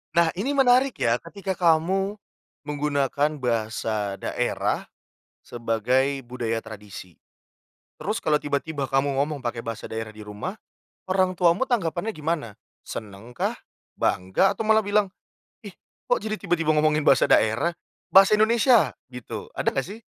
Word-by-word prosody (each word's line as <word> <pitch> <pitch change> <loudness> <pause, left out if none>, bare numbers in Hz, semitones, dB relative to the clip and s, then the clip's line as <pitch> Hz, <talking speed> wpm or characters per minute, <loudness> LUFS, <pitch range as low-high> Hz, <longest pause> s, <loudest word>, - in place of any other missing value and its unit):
Nah, 170 -1 +4
ini 280 +7 -1
menarik 260 0 +4
ya, 115 +1 +1
ketika 190 +2 -5
kamu 185 +4 +2 0.5
menggunakan 145 0 0
bahasa 110 -4 -1
daerah 95 - -2 0.6
sebagai 125 +4 0
budaya 115 -2 -2
tradisi, 100 -5 -11 0.8
terus 215 +4 -3
kalau 150 -1 +2
tiba-tiba 145 0 -2
kamu 135 +1 0
ngomong 145 +1 -1
pakai 120 -2 -4
bahasa 115 -1 -5
daerah 110 -1 -5
di 110 - -13
rumah, 105 - -6 0.6
orang 185 -1 +1
tuamu 180 +9 +3
tanggapannya 205 -2 -1
gimana? 150 -8 -3 0.2
Senengkah? 110 +3 -5 0.4
Bangga? 140 - +2
Atau 220 - -3
malah 220 0 +5
bilang, 205 -2 +1 0.5
"Ih, - - -8 0.3
kok, - - +1
jadi 215 0 -3
tiba-tiba 170 -4 -1
ngomongin 150 0 +3
bahasa - - +5
daerah?" 110 +11 +3 0.4
Bahasa 195 +2 +7
Indonesia? 230 +2 +4 0.2
Gitu. 125 -2 -8
Ada, - - 0
enggak, 135 - -1
sih? 220 +3 -9
150 Hz, 130 wpm, -25 LUFS, 115-195 Hz, 0.8 s, Bahasa